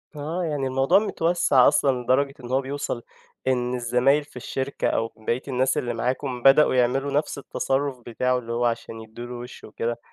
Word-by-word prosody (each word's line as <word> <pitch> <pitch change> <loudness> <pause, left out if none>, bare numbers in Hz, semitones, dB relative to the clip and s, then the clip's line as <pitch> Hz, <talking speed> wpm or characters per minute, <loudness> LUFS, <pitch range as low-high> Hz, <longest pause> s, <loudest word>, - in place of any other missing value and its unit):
آه. 160 +5 -3
يعني 145 -4 -1
الموضوع 135 +7 +3
متوسَّع 165 -9 +3
أصلًا 130 -3 +2
لدرجة 135 +3 +2
إن 120 - -7
هو 135 +1 +2
بيوصل 135 -3 -4 0.4
إن 125 -1 +1
الزمايل 125 +4 +2
في 145 - -22
الشركة 130 +2 -3
أو 115 0 0
بقية 115 +3 -2
الناس 130 0 +1
اللي 120 -1 -1
معاكم 125 +1 -2
بدأوا 135 0 +6
يعملوا 130 +3 +1
نَفس 145 0 -1
التصرُّف 135 -1 -2
بتاعه 125 +2 0
اللي 115 -2 -6
هو 120 +1 0
عشان 115 -1 -3
يدّوا 110 +2 -9
له 125 - -7
وِش 120 +1 -9
وكده. 115 +2 -4
130 Hz, 180 wpm, -24 LUFS, 120-140 Hz, 0.4 s, بدأوا